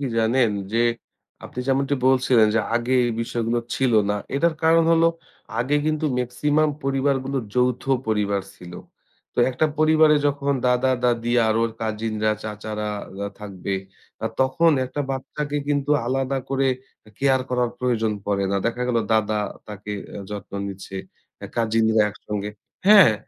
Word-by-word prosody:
কি 140 - -2
জানেন? 115 +1 +3 0.2
যে 115 - +1 0.7
আপনি - - -10
যেমনটি 135 +1 +2
বলছিলেন 130 -3 +4
যে 115 - +4
আগে 120 +2 0
এই 120 - -1
বিষয়গুলো 115 0 -1 0.2
ছিল 130 -3 +1 0.2
না। 105 - +1 0.2
এটার 165 +3 +2
কারণ 165 0 +5
হল 165 - +4 0.6
আগে 130 +5 +1
কিন্তু 155 0 0
মেক্সিমাম 150 +5 +1
পরিবারগুলো 135 0 0 0.2
যৌথ 125 0 +1 0.3
পরিবার 100 -2 +1
ছিল। 90 -2 -11 0.6
তো - - -9
একটা 130 +5 +1
পরিবারে 155 -1 +5
যখন 140 0 0
দাদা-দাদি 125 -2 +1
আর 110 - +2
ওর 115 - +1
কাজিনরা, 110 -1 -1
চাচারা 105 0 -4 0.2
ওরা 100 +1 -4
থাকবে। 100 -1 -4 0.5
আ - - +2
তখন 160 +6 +4
১ 130 - -8
টা - - +1
বাচ্চাকে 145 +2 -3
কিন্তু 145 0 0 0.2
আলাদা 135 +1 0
করে 135 0 +1 0.4
এ - - -16
কেয়ার 135 -1 +3
করার 125 -1 +1
প্রয়োজন 115 -4 0
পড়ে 100 -1 +1
না। 100 - +1
দেখা 120 +1 -1
গেল 120 -2 +2 0.2
দাদা 110 -1 +1 0.3
তাকে 105 0 -8 0.2
অ্যা 100 - -7
যত্ন 105 -1 -7
নিচ্ছে, 95 0 -7 0.4
অ্যা - - -8
কাজিনরা 110 -1 +3
একসঙ্গে 105 0 -5 0.4
হ্যাঁ, 200 - +9
125 Hz, 150 wpm, -23 LUFS, 110-135 Hz, 0.7 s, হ্যাঁ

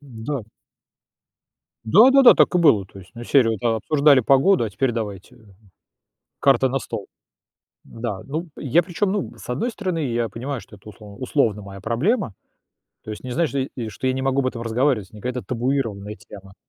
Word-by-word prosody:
Да. 130 -1 -6 1.4
Да-да-да, 250 - +7
так - - +3
и - - +4
было, 140 - +4
то 100 - -14
есть, 95 - -17
ну, 120 - -8
из - - -10
серии 130 -5 +4
вот: 110 -3 -3
а, 115 -2 +1
обсуждали 140 +3 +4
погоду, 135 - +3
а 105 - -4
теперь 125 +5 -1
давайте 105 -4 -6 1.0
карты 135 -1 +4
на 135 +1 -1
стол. - - -6 0.8
Да, 115 -4 -5
ну, 160 +5 -5
я, 150 +5 +2
причем, 190 +3 -2
ну, 205 -2 -3
с - - -13
одной 140 - -1
стороны, 185 -6 -3
я 115 -1 -1
понимаю, 125 +5 -5
что 105 +1 -15
это 100 +2 -16
услов 105 +2 -13
условно 115 -6 0
моя 100 0 -10
проблема, 125 - -1 0.7
то - - -9
есть 105 - -7
не 130 - -6
значит, 165 +3 0
что, 135 -2 -4
э, 115 - -4
что 130 - -6
я 130 - +2
не 130 - -3
могу 135 0 +1
об 130 - -1
этом 120 -2 -4
разговаривать, 115 -3 0
не 105 - -12
какая-то 125 +1 -4
табуированная 115 -5 -2
тема. 95 -3 -14
125 Hz, 190 wpm, -22 LUFS, 110-140 Hz, 1.4 s, Да-да-да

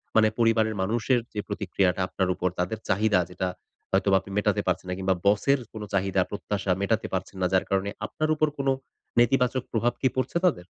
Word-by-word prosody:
মানে 110 -1 +6
পরিবারের 110 -1 +3
মানুষের 120 +5 +1
যে 105 - -3
প্রতিক্রিয়াটা 95 -2 0
আপনার 95 -1 -1
উপর 90 - 0
তাদের 90 +5 -1
চাহিদা 100 0 +3
যেটা, 90 +1 -2 0.4
হয়তোবা 95 0 +4
আপনি 95 +1 -12
মেটাতে 105 0 +2
পারছেন 90 0 0
না, 90 - -1
কিংবা 95 -1 +1
বসের 115 +7 +3
কোন 110 - -7
চাহিদা 95 -1 +2
প্রত্যাশা 100 -2 -2
মেটাতে 105 +2 0
পারছেন 95 +1 -3
না, 90 - +3
যার 95 - +3
কারণে 95 +1 +1 0.2
আপনার 155 0 -2
উপর 155 0 +2
কোন 140 -1 -2 0.5
নেতিবাচক 125 +1 +3
প্রভাব 120 +1 +1
কি 130 - +4
পড়ছে 130 +6 0
তাদের? 115 - +1
105 Hz, 185 wpm, -26 LUFS, 95-115 Hz, 0.5 s, মানে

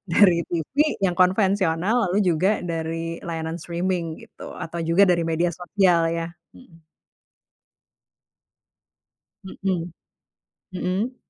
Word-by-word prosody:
dari 180 -3 +6
TV 170 - -4 0.3
yang 180 -3 +1
konvensional, 190 0 +2
lalu 190 +4 +1
juga 185 +3 +1
dari 165 0 -3
layanan 165 0 -4
streaming 170 0 -2
gitu, - - -11
atau 170 +1 -6
juga 165 +3 +3
dari 175 -4 +3
media 165 +2 +1
sosial 175 -1 +2
ya, 165 0 -3 0.2
mhm. 165 -10 -18 2.6
Mhm, 185 -3 -3 0.8
mhm. 190 +7 -2
175 Hz, 100 wpm, -23 LUFS, 165-190 Hz, 2.6 s, dari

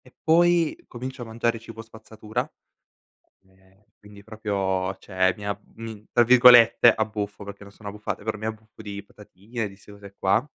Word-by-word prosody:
E 125 - -18
poi 170 0 +3
comincio 130 +1 -7
a - - -5
mangiare 115 0 -2
cibo 115 0 -10
spazzatura, 110 -1 -6 1.1
ehm, 95 +1 -28 0.2
quindi 105 -1 -15
proprio 100 -3 -2
cioè 95 -1 0
mi 105 -1 -8
ab 100 0 -3 0.2
mi 110 -2 -9
tra 120 - +5
virgolette, 120 -1 +7
"abbuffo", 105 -2 -4
perché 100 0 -10
non 100 - -12
sono 105 0 -10
abbuffate, 105 0 -6
però 110 0 -2
mi 110 +1 -6
abbuffo 110 0 -8
di 100 -1 -7
patatine, 105 +2 -7
di 95 - -15
ste 105 +1 -16
cose 100 -1 -13
qua. 95 +6 +2
105 Hz, 170 wpm, -24 LUFS, 100-115 Hz, 1.1 s, virgolette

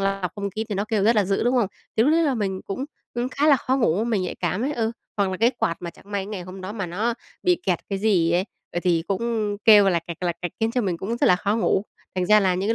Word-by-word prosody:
lọc 195 -2 -1
không 200 -1 -3
khí 220 +4 -3
thì 205 - -2
nó 200 +2 -1
kêu 210 -3 +1
rất 230 +1 +4
là 205 - +4
dữ, 195 +3 0
đúng 245 +2 +2
không? 230 -5 +3 0.3
Thì 220 - +5
lúc 295 +5 +4
đấy 335 - +4
là 285 -5 +2
mình 195 -4 -2
cũng, 255 +7 -4 0.3
ừm, 240 +1 -1
khá 285 +3 0
là 285 -3 +7
khó 260 +1 0
ngủ, 220 -5 +2
mình 225 -5 0
nhạy 180 - -3
cảm 200 +6 -2
ấy, 290 - -1
ừ. 225 -5 0 0.3
Hoặc 200 -2 +1
là 185 - -3
cái 230 +5 +4
quạt 200 -9 -1
mà 170 - -4
chẳng - - -20
may 200 - 0
cái - - -10
ngày 205 -3 -5
hôm 185 +2 -9
đó 185 +2 -6
mà 200 -4 -3
nó 210 +8 -1 0.3
bị 360 -1 +2
kẹt 180 -3 +2
cái 195 -1 -2
gì 185 -6 +2
ấy, 180 +2 +2 0.3
ờ, 175 - -2
thì 170 -3 +2
cũng 210 0 -1
kêu 205 -3 +8
lạch 170 -2 0
cạch, 170 0 -7
lạch 175 -2 -1
cạch 175 - -3
khiến 225 +1 +2
cho 250 +1 0
mình 185 -5 -1
cũng 215 +7 -3
rất - - +2
là 180 - +6
khó 205 +3 0
ngủ, 215 -2 +1 0.3
thành 185 -1 0
ra 210 +2 +6
là 190 -2 +2
những 190 +3 -1
cái 230 - +3
205 Hz, 310 wpm, -24 LUFS, 185-230 Hz, 0.3 s, kêu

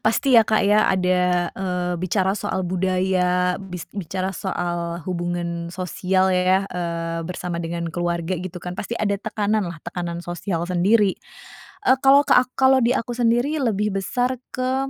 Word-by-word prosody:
pasti, 245 +3 +3
ya, 225 - +9
Kak, 215 0 +2
ya, 210 +1 +4
ada, 180 -1 +2
eee, 180 -2 -2
bicara 190 +2 0
soal 190 0 -2
budaya, 180 0 +1
bis 180 -3 -8
bicara 185 0 -3
soal 175 -2 -3
hubungan 175 -1 -3
sosial, 185 +1 0
ya, 185 +1 +2
eee, 170 -1 -3
bersama 180 0 -4
dengan 170 0 -3
keluarga, 170 +1 -2
gitu, 180 +1 -6
kan. 180 0 -6
Pasti 210 +4 -5
ada 200 -1 +1
tekanan, 210 0 -1
lah, 170 -1 -7
tekanan 175 -1 -4
sosial 175 0 -3
sendiri. 195 +3 +3 0.7
Eee, 260 - +6
kalau 280 +1 +6
ke - - +5
a 250 - +6
kalau 265 0 +5
di 235 - +3
aku 240 0 -3
sendiri 240 +5 +1
lebih 210 -3 0
besar 245 +6 -1 0.2
ke 255 +1 -1
185 Hz, 155 wpm, -22 LUFS, 175-210 Hz, 0.7 s, ya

